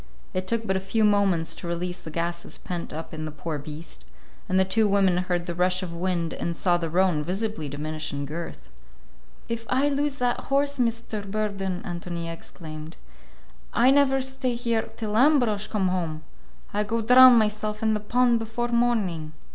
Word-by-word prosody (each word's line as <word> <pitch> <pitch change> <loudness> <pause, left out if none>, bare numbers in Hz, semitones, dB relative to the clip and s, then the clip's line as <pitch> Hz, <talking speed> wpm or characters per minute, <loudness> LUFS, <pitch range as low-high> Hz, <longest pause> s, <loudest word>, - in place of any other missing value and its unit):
It 185 0 -2
took 230 +1 0
but 190 - 0
a - - +1
few 195 +4 0
moments 195 -6 +3
to 175 - -8
release 175 +1 -3
the - - -8
gases 170 +2 -3
pent 175 -2 -5
up 160 +2 -6
in 155 0 -4
the 155 - -5
poor 150 0 -4
beast, 155 +3 -9 0.5
and 185 +1 +3
the 190 - +4
two 215 +3 +3
women 195 -3 +3
heard 180 -1 -1
the 175 - -3
rush 180 +2 +1
of 170 -2 -5
wind 170 -1 -1
and 170 -1 -3
saw 175 -2 +2
the 165 -2 -3
roan 180 -2 +2
visibly 185 -2 -3
diminish 155 +2 -4
in 145 -1 -3
girth. 155 - -7 0.8
"If 230 0 -4
I 270 +3 +3
lose 285 0 0
that 245 -2 0
horse, 280 0 +1
Mr. 230 -3 -1
Burden," 195 -3 -2
Ántonia 170 -2 -4
exclaimed, 155 -1 -9 0.8
"I 250 +3 +6
never 270 -1 +4
stay 265 -1 -1
here 235 -2 -1
till 215 -2 -3
Ambrosch 245 -6 +3
come 195 -4 0
home! 165 -4 -2 0.5
I 205 - +1
go 225 +2 -1
drown 250 +2 +9
myself 215 -1 +1
in 220 0 +3
the 210 - 0
pond 240 +2 +2
before 225 +2 -3
morning." 210 -10 0
190 Hz, 180 wpm, -25 LUFS, 170-230 Hz, 0.8 s, drown